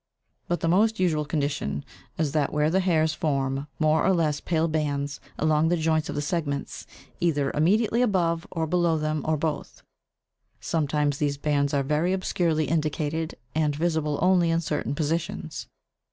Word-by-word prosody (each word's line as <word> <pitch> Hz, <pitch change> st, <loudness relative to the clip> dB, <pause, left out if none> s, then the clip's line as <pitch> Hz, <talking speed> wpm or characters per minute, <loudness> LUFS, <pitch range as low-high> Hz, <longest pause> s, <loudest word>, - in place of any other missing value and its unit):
but 175 Hz, -, -1 dB
the -, -, 0 dB
most 215 Hz, +5 st, +3 dB
usual 160 Hz, -5 st, +2 dB
condition 140 Hz, -, -2 dB, 0.3 s
is 155 Hz, -3 st, 0 dB
that 150 Hz, -2 st, 0 dB
where 150 Hz, +1 st, +1 dB
the 190 Hz, -, +3 dB
hairs 160 Hz, -4 st, +2 dB
form 140 Hz, -3 st, -1 dB
more 155 Hz, 0 st, +3 dB
or 190 Hz, -, +4 dB
less 155 Hz, -4 st, 0 dB
pale 165 Hz, -1 st, +1 dB
bands 145 Hz, -3 st, -2 dB, 0.2 s
along 155 Hz, 0 st, +2 dB
the 175 Hz, +1 st, +2 dB
joints 160 Hz, -1 st, +1 dB
of -, -, -4 dB
the 145 Hz, -, -1 dB
segments, 145 Hz, -3 st, -3 dB, 0.3 s
either 145 Hz, -5 st, +1 dB
immediately 210 Hz, +9 st, +2 dB
above 170 Hz, -8 st, +1 dB
or 165 Hz, -2 st, -2 dB
below 170 Hz, 0 st, +2 dB
them 155 Hz, 0 st, -1 dB
or 155 Hz, 0 st, +1 dB
both; 155 Hz, 0 st, -4 dB, 0.8 s
sometimes 150 Hz, -2 st, 0 dB
these 145 Hz, -1 st, 0 dB
bands 145 Hz, -1 st, +1 dB
are 140 Hz, -1 st, +1 dB
very 150 Hz, +6 st, +1 dB
obscurely 170 Hz, -4 st, 0 dB
indicated, 155 Hz, +1 st, -1 dB, 0.2 s
and 150 Hz, -2 st, +1 dB
visible 155 Hz, -2 st, 0 dB
only 180 Hz, -2 st, +4 dB
in 165 Hz, 0 st, +2 dB
certain 150 Hz, -3 st, -2 dB
positions. 150 Hz, -, -3 dB
155 Hz, 160 wpm, -26 LUFS, 145-170 Hz, 0.8 s, or